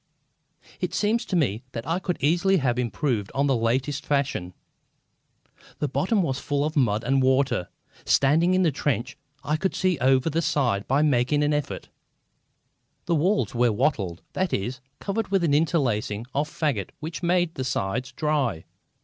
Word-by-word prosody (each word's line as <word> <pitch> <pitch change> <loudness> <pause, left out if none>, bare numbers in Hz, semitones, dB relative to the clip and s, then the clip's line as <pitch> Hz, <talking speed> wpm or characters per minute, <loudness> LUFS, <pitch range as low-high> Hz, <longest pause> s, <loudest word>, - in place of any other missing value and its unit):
It - - -2
seemed 215 +3 +2
to 190 - -1
me 120 - +1
that 115 -1 -5
I 165 +3 0
could 180 -1 -2
easily 175 +6 +3
have 125 -5 0
improved 120 -3 -1
on 140 +1 +2
that 140 - +2
latest 130 +5 0
fashion. 140 -12 -1 1.2
The 150 - -1
bottom 190 - +1
was 135 -4 -1
full 145 0 -1
of 155 - -3
mud 115 -6 +2
and 135 +2 +2
water. 130 -8 +2 0.3
Standing 160 +7 +3
in 185 - +3
the 165 - +3
trench, 135 -2 -2 0.3
I 150 +1 0
could 190 +3 -1
see 185 -4 +1
over 130 +2 +3
the 165 +1 +1
side 120 -11 0
by 140 +3 +3
making 145 +1 +2
an 150 0 +2
effort. 145 -2 -3 1.2
The 170 - 0
walls 180 +7 +1
were 120 -1 +3
wattled 105 - -1
that 185 -2 -1
is, 120 +6 -2 0.2
covered 200 +2 -2
with 195 -2 +1
an 155 -4 +2
interlacing 120 - +1
of 150 +2 0
fagots 145 -12 -1
which 160 +3 -6
made 175 -1 +1
the 130 - -4
sides 125 +2 -2
dry. 135 - -1
140 Hz, 165 wpm, -25 LUFS, 125-165 Hz, 1.2 s, easily